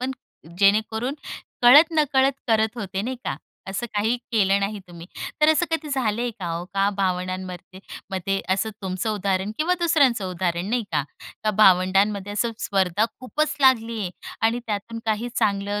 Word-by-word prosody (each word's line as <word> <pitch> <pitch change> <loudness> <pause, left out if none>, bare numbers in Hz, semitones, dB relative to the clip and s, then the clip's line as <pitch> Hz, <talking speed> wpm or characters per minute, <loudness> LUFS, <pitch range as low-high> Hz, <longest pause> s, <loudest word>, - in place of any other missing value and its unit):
पण 255 +1 -2 0.5
जेणेकरून 220 +6 +2 0.5
कळत 295 +7 +8
नकळत 270 -2 +3 0.2
करत 220 +1 +2
होते, 195 -2 -3
नाही 255 +4 -3
का. - - -2 0.3
असं 195 +5 -3
काही 220 +4 +1 0.2
केलं 200 -3 +3
नाही 200 +1 -2
तुम्ही. 170 -1 -11 0.3
तर 305 - +5
असं 315 +3 +3
कधी 325 -1 -2
झालंय 240 -3 -1
का 185 - -5
हो 170 +1 -4
का 195 0 +3
भावंडांमध्ये 185 -1 -3 0.3
मध्ये 195 +1 -1
असं 220 +3 -2
तुमचं 185 +3 -2
उदाहरण 195 0 -1
किंवा 335 +4 +2
दुसऱ्यांचं 280 - +3
उदाहरण 175 0 -2
नाही 245 0 +1
का, 150 - +2 0.4
का 215 - +3
भावंडांमध्ये 195 +1 +4
असं 230 +3 -1
स्पर्धा 195 0 +1 0.2
खूपच 300 +4 -1
लागली 230 -4 +3
आहे 185 -3 -3 0.4
आणि 235 +2 0
त्यातून 220 +2 -4
काही 220 +2 0
चांगलं 205 -1 0
210 Hz, 155 wpm, -23 LUFS, 190-245 Hz, 0.5 s, कळत